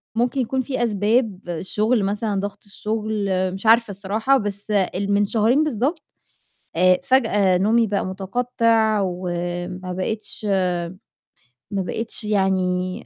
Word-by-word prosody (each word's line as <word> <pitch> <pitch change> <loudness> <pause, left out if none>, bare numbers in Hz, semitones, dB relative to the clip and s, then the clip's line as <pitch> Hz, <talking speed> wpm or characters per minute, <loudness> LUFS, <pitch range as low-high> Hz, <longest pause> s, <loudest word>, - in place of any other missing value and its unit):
ممكن 245 +3 +1
يكون 260 +2 -1
فيه 260 -1 -2
أسباب 215 -1 +1
الشُّغل 210 +6 +1
مثلًا، 205 0 -1
ضغط 205 +1 -5
الشُّغل، 210 0 -3 0.3
مش 195 +4 -7
عارفة 230 -1 +5
الصراحة، 215 +7 +1
بس 205 -1 -4
ال 200 0 0
من 205 0 +3
شهرين 230 +8 +2
بالضبط، 295 - -1 0.8
آآ 185 +1 +5
فجأة 210 -8 +3
نومي 225 +4 +3
بقى 200 -2 -1
مُتقطع 220 +2 +1
وما 175 0 -4
بقيتش 215 +4 -3 1.3
ما 195 -1 -1
بقيتش 225 +4 -4
يعني 185 -3 0
205 Hz, 120 wpm, -22 LUFS, 190-230 Hz, 1.3 s, عارفة